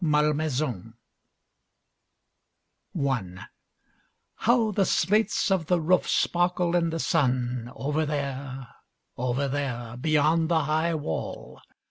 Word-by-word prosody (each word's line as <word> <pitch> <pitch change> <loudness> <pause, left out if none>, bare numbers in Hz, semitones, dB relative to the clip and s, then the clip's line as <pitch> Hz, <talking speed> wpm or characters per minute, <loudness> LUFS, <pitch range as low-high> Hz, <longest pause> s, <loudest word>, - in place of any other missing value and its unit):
Malmaison 150 - 0 2.0
I 100 -10 -2 0.9
How 230 -1 +2
the 200 -1 +2
slates 205 +3 +1
of 180 -5 +1
the 180 -1 +2
roof 180 +3 +2
sparkle 175 0 +1
in 170 -1 +2
the 165 - -3
sun, 125 -7 0
over 150 +3 -1
there, 135 -3 -4 0.5
over 125 +3 -1
there, 125 -4 -3
beyond 155 +3 +2
the 160 -2 +2
high 160 +3 0
wall! 110 - -5
150 Hz, 100 wpm, -26 LUFS, 130-170 Hz, 2.0 s, How